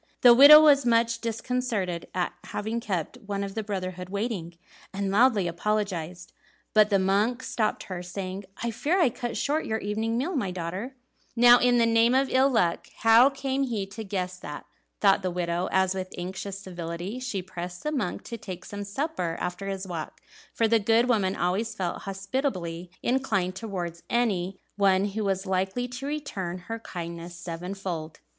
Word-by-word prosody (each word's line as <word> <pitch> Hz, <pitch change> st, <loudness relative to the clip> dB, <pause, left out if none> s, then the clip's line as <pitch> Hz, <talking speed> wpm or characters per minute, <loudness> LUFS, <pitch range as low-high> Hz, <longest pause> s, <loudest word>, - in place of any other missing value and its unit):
The 245 Hz, -1 st, +9 dB
widow 285 Hz, +5 st, +11 dB
was 290 Hz, -3 st, +6 dB
much 230 Hz, -1 st, +2 dB
disconcerted 230 Hz, -6 st, -2 dB
at 180 Hz, -1 st, -1 dB
having 220 Hz, +3 st, -3 dB
kept 185 Hz, -8 st, -3 dB
one 200 Hz, -1 st, -2 dB
of 195 Hz, -1 st, -5 dB
the 220 Hz, -, -2 dB
brotherhood 185 Hz, -3 st, -4 dB
waiting, 200 Hz, -5 st, -3 dB, 0.3 s
and 195 Hz, 0 st, -2 dB
loudly 210 Hz, -3 st, +4 dB
apologized, 180 Hz, -2 st, -2 dB, 0.4 s
but 215 Hz, -1 st, +5 dB
the 200 Hz, -, +4 dB
monk 205 Hz, +6 st, +1 dB
stopped 215 Hz, -2 st, -1 dB
her, 185 Hz, -2 st, -6 dB
saying, 185 Hz, +2 st, -6 dB, 0.2 s
"I 235 Hz, -, 0 dB
fear 320 Hz, -, 0 dB
I 335 Hz, -, +5 dB
cut 240 Hz, +1 st, -4 dB
short 300 Hz, +3 st, 0 dB
your 220 Hz, -, 0 dB
evening 220 Hz, +2 st, -2 dB
meal, 320 Hz, +9 st, -1 dB
my 215 Hz, -9 st, 0 dB
daughter." 185 Hz, +8 st, -5 dB, 0.4 s
"Now 240 Hz, +1 st, +8 dB
in 245 Hz, 0 st, +4 dB
the 235 Hz, -, +4 dB
name 230 Hz, +2 st, +4 dB
of 270 Hz, 0 st, +3 dB
ill 260 Hz, +1 st, +4 dB
luck, 180 Hz, -10 st, +1 dB
how 230 Hz, +4 st, +7 dB
came 275 Hz, -1 st, -2 dB
he 220 Hz, -6 st, -2 dB
to 195 Hz, +3 st, -8 dB
guess 185 Hz, -2 st, -3 dB
that?" 150 Hz, -3 st, -8 dB, 0.4 s
thought 195 Hz, -2 st, +5 dB
the 185 Hz, -, -1 dB
widow, 175 Hz, 0 st, -1 dB
as 190 Hz, 0 st, +2 dB
with 185 Hz, -1 st, -5 dB
anxious 190 Hz, +2 st, -5 dB
civility 175 Hz, +3 st, -6 dB
she 240 Hz, -8 st, -3 dB
pressed 180 Hz, 0 st, -7 dB
the 300 Hz, -, -1 dB
monk 245 Hz, -12 st, -2 dB
to 235 Hz, -1 st, -7 dB
take 185 Hz, -4 st, -8 dB
some 205 Hz, 0 st, -6 dB
supper 200 Hz, -, -3 dB
after 180 Hz, +2 st, -4 dB
his 195 Hz, 0 st, -3 dB
walk; 165 Hz, -4 st, -6 dB, 0.3 s
for 225 Hz, -, +1 dB
the 225 Hz, 0 st, +4 dB
good 225 Hz, +3 st, +3 dB
woman 195 Hz, -5 st, +2 dB
always 205 Hz, +5 st, -1 dB
felt 180 Hz, -4 st, -3 dB
hospitably 190 Hz, -, -3 dB
inclined 215 Hz, -8 st, 0 dB
towards 180 Hz, -6 st, -5 dB
any 195 Hz, -6 st, 0 dB, 0.2 s
one 195 Hz, 0 st, +3 dB
who 215 Hz, +2 st, -3 dB
was 195 Hz, -1 st, -1 dB
likely 190 Hz, +6 st, -1 dB
to 255 Hz, +3 st, -6 dB
return 205 Hz, -12 st, -4 dB
her 225 Hz, +6 st, -6 dB
kindness 170 Hz, -3 st, -7 dB
sevenfold. 175 Hz, -2 st, -5 dB
200 Hz, 175 wpm, -27 LUFS, 180-235 Hz, 0.4 s, widow